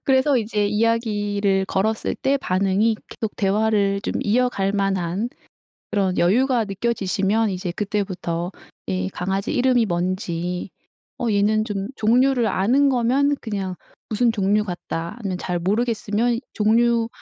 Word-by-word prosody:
그래서 265 +1 +3
이제 210 -3 0
이야기를 205 -3 +1
걸었을 215 +4 0
때 270 +1 +1
반응이 200 0 +1
계속 220 -2 -5
대화를 200 0 +1
좀 - - -3
이어갈 210 -3 +1
만한 195 +1 -1 0.6
그런 195 -3 +1
여유가 240 +6 +3
느껴지시면 205 0 0
이제 180 -1 -3
그때부터 185 -3 -3 0.4
이 90 0 -1
강아지 195 +4 -2
이름이 250 -2 +3
뭔지 180 -1 -2 0.5
"어 240 - 0
얘는" 210 +2 +2
좀 200 -3 -3
종류를 245 +2 +3
아는 260 +10 +3
거면 265 +3 +2
그냥 195 -4 -3 0.3
"무슨 230 +2 +2
종류 210 0 +1
같다." 170 -2 -5
아니면 195 -5 -3
잘 175 -1 -2
모르겠으면 225 +3 0
"종류 230 +2 +3
210 Hz, 285 characters per minute, -22 LUFS, 190-230 Hz, 0.6 s, 그래서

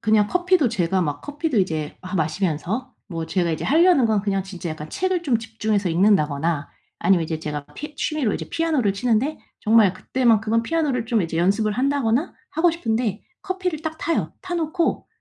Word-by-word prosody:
그냥 215 -1 +3
커피도 355 - +2
제가 185 -4 0
막 145 -2 -2
커피도 290 -4 -2
이제 155 -5 -2
아 185 +1 -5
마시면서 175 - -1
뭐 165 -4 -5
제가 175 -1 0
이제 155 - -3
하려는 320 -4 +5
건 215 -2 +2
그냥 195 -2 0
진짜 180 -3 -6
약간 155 0 -7
책을 370 -1 0
좀 260 -8 +2
집중해서 220 -3 -1
읽는다거나 165 -4 +2 0.3
아니면 185 -3 +3
이제 160 0 -3
제가 150 -2 -4
피 300 +1 -7
취미로 290 -7 -1
이제 - - -5
피아노를 310 -11 +1
치는데 245 +7 0 0.2
정말 215 -4 +5
그때만큼은 230 0 +2
피아노를 275 -5 0
좀 225 -5 +2
이제 165 -1 -3
연습을 200 +5 +2
한다거나 270 - +1 0.2
하고 335 +2 +3
싶은데 225 - -1 0.2
커피를 370 -5 -2
딱 315 -1 -4
타요. 335 - -1
타 360 -1 -4
놓고 330 +1 -1
220 Hz, 395 characters per minute, -23 LUFS, 185-295 Hz, 0.3 s, 하려는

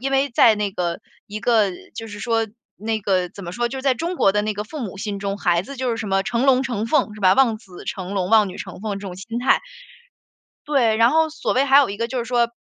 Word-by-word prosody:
因 270 +2 -2
为 270 +1 +2
在 235 -1 +5
那 205 -2 -2
个 175 -2 -2 0.3
一 210 +1 -6
个， 220 -5 +3 0.2
就 225 -1 -7
是 205 - -8
说 225 -2 0 0.3
那 220 +2 -2
个 185 -3 0
怎 200 +2 -11
么 175 - -6
说 240 +4 -1
就 265 - -6
是 260 - -7
在 270 -2 +3
中 340 +8 -3
国 195 - +3
的 210 - +1
那 215 0 -1
个 205 +1 -4
父 295 +8 -8
母 195 -5 -6
心 205 -2 -4
中， 200 0 -3
孩 175 -3 +2
子 275 +7 -9
就 255 -1 -1
是 230 - -1
什 215 -2 -4
么 195 0 +2
成 235 +2 0
龙、 260 -1 +5
成 230 -4 -2
凤， 230 -5 +1
是 210 - -11
吧？ 185 0 +5
望 245 -5 +3
子 185 -5 -13
成 190 -2 -5
龙、 185 -2 -1
望 215 -3 +5
女 180 - -8
成 185 -1 -8
凤 205 -2 -3
这 200 - -8
种 180 - -6
心 230 +5 -5
态 250 - +3 1.1
对， 250 -7 +2
然 230 +2 +5
后 320 0 +3
所 315 - -2
谓 260 - +3
还 275 0 +6
有 285 -5 +5
一 200 - -6
个 230 0 -1
就 255 - -4
是 235 - -2
说， 240 -1 +1
220 Hz, 300 characters per minute, -22 LUFS, 200-250 Hz, 1.1 s, 还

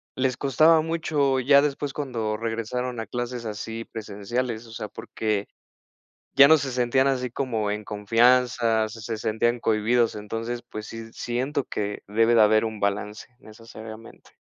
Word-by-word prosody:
les 130 -2 0
costaba 155 +4 +4
mucho 155 -4 0
ya 140 +2 +5
después, 145 -1 -2
cuando 115 -7 -3
regresaron 115 +2 -3
a 110 - -5
clases 120 +1 -4
así 110 +1 -5
presenciales, 110 +2 -4
o 115 - -13
sea, 105 -2 -6
porque 105 -1 -3 0.9
ya 140 +1 +8
no 160 - +8
se 135 -3 -3
sentían 125 +2 +2
así 125 -2 0
como 115 -5 -2
en 105 0 -4
confianza, 115 +1 +2
se 110 0 -6
sentían 115 +3 0
cohibidos. 115 +2 +2
Entonces, 115 +3 -4
pues, 110 0 -7
sí, 115 0 -9
siento 130 +4 -2
que 105 -3 -4
debe 115 +3 +3
de 115 - +6
haber 110 +1 +4
un 110 -2 -5
balance 105 +1 -2
necesariamente. 110 0 -12
115 Hz, 150 wpm, -25 LUFS, 110-125 Hz, 0.9 s, ya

